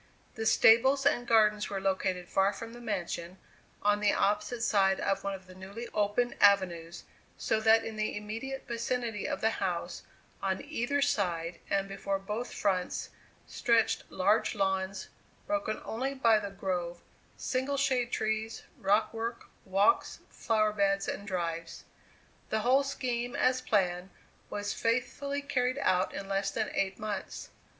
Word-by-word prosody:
The 225 -1 -2
stables 265 +7 +5
and 245 -4 +2
gardens 210 -2 +4
were 195 - -2
located 190 -2 -1
far 195 +2 +2
from 230 +3 -8
the 240 - -10
mansion, 185 -4 -4 0.5
on 205 0 +3
the 210 -1 +3
opposite 210 +4 0
side 195 -4 +3
of 195 0 0
one 200 0 -2
of 190 -1 -12
the 185 - -13
newly 195 +6 -8
opened 210 +4 0
avenues, 175 -4 +3 0.3
so 220 - 0
that 225 +1 +5
in 220 -1 -6
the 215 -1 -1
immediate 225 +6 -5
vicinity 235 -2 -2
of - - -3
the 220 - +3
house, 180 -2 -2 0.4
on 190 -1 -1
either 285 -1 0
side 175 -9 -1
and 195 0 +1
before 195 0 -2
both 210 +5 -4
fronts, 185 -3 -1 0.3
stretched 230 -2 +1
large 205 +5 +2
lawns, 190 -1 -1 0.4
broken 300 -8 -1
only 265 +5 -2
by 230 -5 +4
the 200 -1 -5
grove, 180 -3 -3 0.4
single 265 +2 -1
shade 255 -3 +1
trees, 220 +1 -2 0.2
rock 205 +4 +2
work, 230 +1 -4 0.2
walks, 195 - +2
flower 215 -2 +1
beds 195 -1 +1
and 200 - -4
drives. 170 -3 -3 0.7
The 220 - 0
whole 255 +4 +4
scheme 245 -2 -3
as 255 -1 +2
planned 185 -6 0 0.4
was 205 0 -3
faithfully 280 +5 -1
carried 255 -2 0
out 185 -8 +2
in 195 0 -6
less 195 0 0
than 220 +1 -2
eight 195 -1 -1
months. 210 -2 -5
210 Hz, 150 wpm, -30 LUFS, 195-235 Hz, 0.7 s, stables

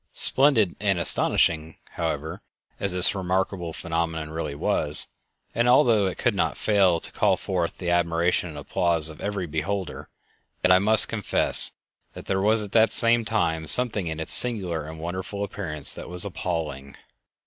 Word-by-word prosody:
Splendid 130 -9 +2
and 100 -3 -1
astonishing, 80 -1 -1
however, 80 -1 -5 0.4
as 100 - -1
this 90 +1 +5
remarkable 95 -2 -3
phenomenon 80 -1 -5
really 80 -3 -6
was, 75 +1 +4 0.5
and 120 +2 0
although 120 -6 +3
it 95 - -6
could - - -1
not - - -2
fail 95 -5 +1
to - - -1
call - - 0
forth 90 -3 -4
the 90 -2 -4
admiration 85 +1 -1
and 75 - -11
applause 80 +2 0
of 80 - -13
every 100 -2 -4
beholder, 85 +5 -5 0.5
yet 90 - +3
I 90 - +5
must 110 +3 +7
confess 110 -3 +2 0.4
that - - -12
there 95 0 -2
was 110 +2 +1
at 100 - -9
the 110 -1 +3
same 115 0 +2
time 80 -8 -2
something 110 -3 +3
in 80 0 -6
its 80 - +2
singular 90 -10 +3
and 80 0 -11
wonderful 95 +4 -6
appearance 80 -8 -2
that - - -10
was 90 +2 +3
appalling... 80 -8 -6
90 Hz, 160 wpm, -23 LUFS, 80-100 Hz, 0.5 s, must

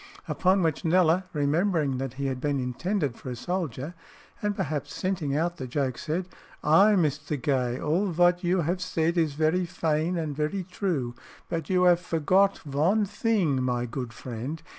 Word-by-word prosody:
Upon 185 0 +2
which 160 0 0
Kneller, 175 +1 +3
remembering 150 -2 +1
that 135 -2 -3
he 140 +1 -3
had 130 -2 -2
been 145 -1 0
intended 140 - -1
for - - -8
a 125 - -4
soldier, 160 0 -3 0.5
and 205 -1 0
perhaps 150 -4 -3
scenting 170 -7 -1
out 170 +2 -1
the 130 - -5
joke, 130 -1 -1
said, 175 +4 -2 0.4
"Ay, 195 +8 +6
Mr. 150 -3 0
Gay, 125 -1 0
all 170 +7 +1
vot 175 +1 +3
you 180 +1 +2
'ave 175 +4 -1
said 165 -1 0
is 160 -4 +1
very 160 +4 +1
faine 165 0 0
and 155 -3 -3
very 155 +6 -1
true, 170 -9 -2 0.4
but 165 -3 -3
you 180 -1 +3
'ave 175 -1 +5
forgot 185 +5 +2
von 165 +10 +2
theeng, 200 - +1
my 125 -1 0
good 120 0 -5
friend. 125 +7 -6
160 Hz, 170 wpm, -27 LUFS, 140-180 Hz, 0.5 s, Ay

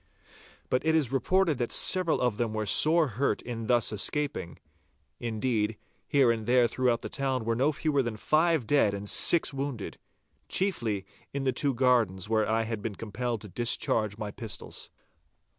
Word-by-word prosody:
But 125 - +1
it 160 0 +2
is 145 -6 +1
reported 165 +2 +1
that 120 - -2
several 185 -3 +2
of 125 -4 0
them 115 -2 -2
were 110 0 -2
sore 155 - +5
hurt 120 -1 -1
in 115 -2 -6
thus 120 -4 +3
escaping—indeed, 105 - -3 0.3
here 135 -5 +4
and 110 -2 -4
there 125 -1 +4
throughout 120 -1 0
the - - -3
town 130 -4 -2
were 115 0 0
no 135 +6 +2
fewer 150 -1 0
than 120 -4 -4
five 155 +1 +2
dead 110 -5 +2
and 100 +1 -7
six 165 +7 +3
wounded, 135 -5 -5 0.5
chiefly 115 - -1 0.3
in 140 - -2
the 130 -1 +1
two 140 +1 0
gardens 115 -7 +2
where 110 -1 +1
I 115 +1 +1
had 110 -1 -4
been 110 -2 -4
compelled 115 +2 -4
to 105 - -9
discharge 110 -1 0
my 105 -2 -5
pistols. 110 -1 -5
120 Hz, 165 wpm, -28 LUFS, 110-140 Hz, 0.5 s, sore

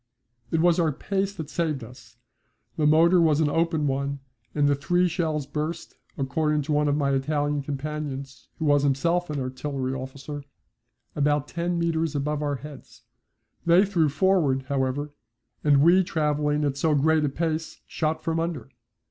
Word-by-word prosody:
It 160 - +1
was 175 0 +4
our 165 -2 +2
pace 195 +6 -2
that 160 -4 -7
saved 155 -7 -1
us. 125 +3 -14 0.6
The 150 - +2
motor 170 +3 +5
was 155 -3 +3
an 150 -2 +2
open 165 -2 +1
one, 140 0 -1 0.4
and 145 -1 +3
the 145 - +4
three 175 +6 +1
shells 160 -4 -1
burst, 150 +3 -4 0.2
according 150 +2 0
to 155 - -4
one 150 0 +2
of 145 - +2
my 140 -2 +1
Italian 145 +1 0
companions 140 -1 -5
who 160 - -3
was 145 -1 +4
himself 165 +6 +1
an 150 -2 -2
artillery 130 0 -3
officer, 135 +2 -7 0.7
about 145 0 +1
ten 175 0 -2
metres 165 -2 0
above 150 +1 -1
our 145 -1 -1
heads. 145 0 -11 0.6
They 175 +4 +5
threw 170 -6 +2
forward, 150 -5 +2
however, 140 +2 -1 0.5
and 145 -2 +4
we 180 +3 +6
travelling 150 -2 0
at 140 -1 -1
so 155 +2 +2
great 155 +2 +3
a 145 - +1
pace 160 +2 -3
shot 155 0 -2
from 165 0 0
under. 160 -7 -4
150 Hz, 165 wpm, -25 LUFS, 140-165 Hz, 0.7 s, we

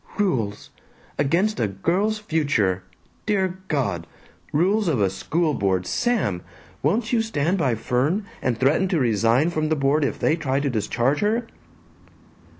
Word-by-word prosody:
"Rules! 120 - -1 0.5
Against 175 +10 +1
a 115 - +2
girl's 175 - 0
future! 140 - 0 0.5
Dear 190 -3 0
God! 100 - -1 0.4
Rules 190 +7 +2
of 145 -8 +1
a 95 -2 +2
school 155 - 0
board! 95 -6 0
Sam! 195 - 0 0.4
Won't 230 +3 0
you 230 - +4
stand 185 -4 0
by 130 -7 +1
Fern, 130 - 0 0.2
and 125 -3 0
threaten 145 +8 +3
to 180 -3 +1
resign 120 - +2
from 155 -2 -1
the 155 - +2
board 145 +1 +2
if 140 - -1
they 155 - +2
try 140 -5 -1
to 140 -1 -1
discharge 120 +5 0
her?" 225 +3 +1
150 Hz, 150 wpm, -23 LUFS, 115-190 Hz, 0.5 s, you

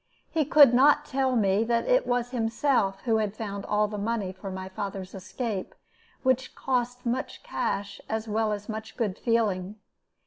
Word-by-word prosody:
He 315 -3 +1
could 280 -3 +7
not 290 +4 +5
tell 265 -2 0
me 200 -1 +3
that 235 0 +1
it - - +3
was 245 0 0
himself 225 -4 +1
who 225 -3 +2
had 215 -1 -2
found 200 -3 -5
all 210 0 +2
the 210 0 -5
money 210 -2 -1
for 195 +1 -8
my 190 0 -5
father's 190 -1 -5
escape, 195 +1 -4 0.5
which 260 -1 +1
cost 250 -1 -1
much 245 +2 -3
cash 200 0 -3
as 220 0 -2
well 215 0 0
as 210 0 -4
much 220 0 -6
good 215 -6 -1
feeling. 210 -5 0
220 Hz, 170 wpm, -27 LUFS, 200-245 Hz, 0.5 s, could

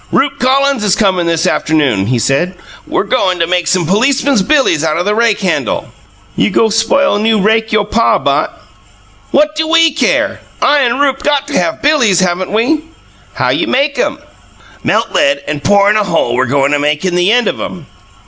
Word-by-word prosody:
Rupe 275 0 0
Collins 270 -1 +1
is 205 -2 +2
comin' 185 -5 0
this 165 +1 0
afternoon, 145 - 0
he 125 +1 0
said. 140 +10 -1 0.3
We're - - -1
goin' 200 -4 0
to 170 - 0
make 175 0 -1
some 185 -2 +1
policemen's 255 - +1
billies 260 - +1
out 155 -1 0
of 175 - -2
the 210 - +1
rake 225 -1 +1
handle." 190 - -2 0.5
"You - - +1
go' 225 - +1
spoil 225 +3 +1
new 220 0 +1
rake 220 +2 +1
you' 215 -1 +2
pa 230 +3 +1
bought?" - - -2 0.7
"What 300 +2 +1
do 315 0 -1
WE 330 0 +3
care? 325 - 0 0.2
I 295 0 +2
and 250 -1 0
Rupe 275 -2 0
got 285 -1 0
to 285 - 0
have 325 0 -3
billies, 260 - +3
haven't 185 0 -1
we?" 245 +9 0 0.5
"How - - 0
you - - 0
make 280 - 0
'em?" - - -1 0.7
"Melt - - 0
lead 280 -1 +1
and 145 -1 -4
pour 200 0 +3
in 215 - +2
a 210 - +1
hole 170 -5 -1
we're 130 0 0
goin' 140 +2 +1
to 145 - +1
make 150 +4 -1
in 185 - -1
the 180 +3 +2
end 245 +1 +2
of - - -3
'em. - - -7
210 Hz, 200 wpm, -12 LUFS, 175-275 Hz, 0.7 s, WE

